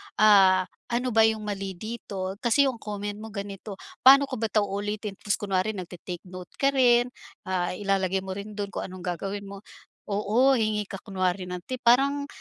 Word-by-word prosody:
"ah, 195 Hz, -3 st, +6 dB, 0.2 s
ano 245 Hz, +1 st, -1 dB
ba 220 Hz, 0 st, +5 dB
iyung 220 Hz, -1 st, -1 dB
mali 195 Hz, -2 st, -4 dB
dito? 200 Hz, -2 st, -6 dB
Kasi 245 Hz, +4 st, +3 dB
iyung 255 Hz, -4 st, -1 dB
comment 205 Hz, 0 st, -5 dB
mo 220 Hz, -, -7 dB
ganito. 200 Hz, 0 st, -6 dB, 0.2 s
Paano 275 Hz, +2 st, +8 dB
ko 260 Hz, -5 st, -4 dB
ba 225 Hz, -, 0 dB
ito 215 Hz, 0 st, +2 dB
ulitin?" 205 Hz, +1 st, -3 dB
Tapos, 205 Hz, -, 0 dB
kunwari 200 Hz, +1 st, -1 dB
nagte-take 180 Hz, -1 st, -7 dB
note 180 Hz, -1 st, -10 dB
ka 275 Hz, 0 st, +2 dB
rin. 245 Hz, -2 st, +4 dB, 0.3 s
Ah, 180 Hz, -2 st, -1 dB
ilalagay 195 Hz, -1 st, 0 dB
mo 190 Hz, -, -6 dB
rin 200 Hz, +2 st, -7 dB
doon 200 Hz, -2 st, -4 dB
kung -, -, -4 dB
anong 185 Hz, -1 st, -10 dB
gagawin 195 Hz, +3 st, -4 dB
mo 200 Hz, 0 st, -9 dB, 0.5 s
oo, 215 Hz, +6 st, +2 dB
hingi 215 Hz, -2 st, 0 dB
ka 195 Hz, -, -7 dB
kunwari 185 Hz, -2 st, -1 dB
ng 180 Hz, -1 st, -6 dB
tip. 255 Hz, -1 st, -4 dB
Parang, 280 Hz, +4 st, +3 dB
205 Hz, 185 wpm, -26 LUFS, 190-225 Hz, 0.5 s, Paano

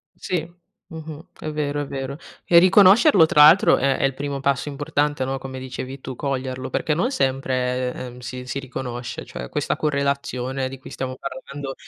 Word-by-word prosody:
Sì. 175 Hz, 0 st, -4 dB, 0.3 s
Mh-mh. 160 Hz, 0 st, -8 dB
È 155 Hz, -, -6 dB
vero, 145 Hz, -1 st, -2 dB
è -, -, -5 dB
vero. 135 Hz, 0 st, -5 dB, 0.3 s
E 170 Hz, -, +6 dB
riconoscerlo 195 Hz, -, +7 dB
tra 150 Hz, -1 st, +5 dB
l'altro 160 Hz, +6 st, +7 dB
è 135 Hz, -1 st, +2 dB
è -, -, -4 dB
il 135 Hz, -, +3 dB
primo 140 Hz, 0 st, -4 dB
passo 140 Hz, +1 st, 0 dB
importante, 145 Hz, -1 st, -1 dB
no, 135 Hz, +1 st, -2 dB
come 130 Hz, -1 st, -7 dB
dicevi 130 Hz, +1 st, -7 dB
tu: 130 Hz, -1 st, -7 dB
coglierlo, 130 Hz, -1 st, -3 dB
perché 150 Hz, -, 0 dB
non 195 Hz, -, 0 dB
sempre, 130 Hz, -, 0 dB
ehm, 125 Hz, -1 st, -8 dB
si 125 Hz, +1 st, -7 dB
si 125 Hz, +2 st, -4 dB
riconosce, 125 Hz, -2 st, -6 dB
cioè 65 Hz, -1 st, -7 dB
questa -, -, -1 dB
correlazione 140 Hz, -3 st, -1 dB
di 135 Hz, -, -9 dB
cui -, -, -11 dB
stiamo 130 Hz, -1 st, -5 dB
parlando 135 Hz, +1 st, -7 dB
135 Hz, 175 wpm, -22 LUFS, 130-150 Hz, 0.3 s, riconoscerlo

